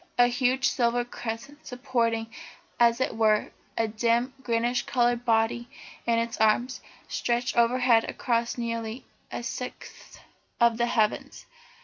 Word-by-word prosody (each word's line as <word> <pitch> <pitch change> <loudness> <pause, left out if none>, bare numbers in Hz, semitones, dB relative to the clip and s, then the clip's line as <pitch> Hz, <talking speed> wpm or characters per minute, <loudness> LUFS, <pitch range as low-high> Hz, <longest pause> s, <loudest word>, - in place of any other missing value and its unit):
A 245 - +7
huge 255 +2 +1
silver 240 -1 +1
crescent, 245 +6 -7
supporting, 230 -3 -1 0.5
as 235 0 +4
it 260 - -1
were, 215 -1 +2 0.3
a 225 - +2
dim 235 +4 +1
greenish 240 0 0
coloured 240 -1 +1
body 230 +1 +1 0.4
in 230 -1 +3
its 230 +1 -1
arms, 240 +4 +2 0.3
stretched 240 +1 -1
overhead 235 -1 +3
across 235 0 -1
nearly 230 0 -4 0.3
a - - -5
sixth 250 +1 -7 0.4
of 235 -1 +4
the 240 - +2
heavens. 215 -3 -1
235 Hz, 125 wpm, -27 LUFS, 230-245 Hz, 0.5 s, A